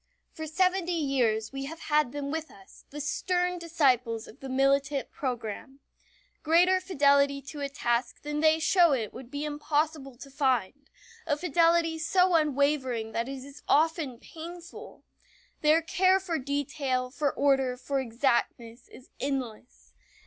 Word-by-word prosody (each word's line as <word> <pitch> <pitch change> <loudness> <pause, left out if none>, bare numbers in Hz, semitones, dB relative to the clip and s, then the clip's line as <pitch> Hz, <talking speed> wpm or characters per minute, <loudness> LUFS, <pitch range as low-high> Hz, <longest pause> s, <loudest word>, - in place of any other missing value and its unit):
For 315 0 -7
seventy 365 +2 +1
years 240 -6 0
we 270 0 -4
have 325 +4 -8
had 300 -4 +1
them 285 0 -4
with 320 0 -4
us 195 -1 -17
the 295 - -8
stern 360 +4 -1
disciples 255 -9 +1
of - - -14
the 270 - -8
militant 275 +1 +1
program. 255 +1 -5 0.6
Greater 360 +4 +4
fidelity 280 -5 +3
to 295 +2 -9
a 280 - -2
task 240 -3 -2
than 295 0 -3
they 315 0 +4
show 340 -1 +4
it 225 -6 -2
would 245 -1 -10
be 285 +2 -4
impossible 295 -2 -2
to 275 +2 -12
find 270 -1 -1 0.4
a 290 - +1
fidelity 335 -1 +2
so 360 +3 +2
unwavering 280 -7 +1
that 230 +3 -2
it 270 -1 -6
is 280 +1 -12
often 310 -4 +2
painful. 340 +6 -11 0.6
Their 315 +2 +4
care 370 +3 +3
for 350 -4 -3
detail, 270 -2 -2
for 285 +1 0
order, 270 -3 +1
for 275 +2 -2
exactness, 235 -1 -1
is 255 - -16
endless. 220 - -5
280 Hz, 145 wpm, -28 LUFS, 260-320 Hz, 0.6 s, Greater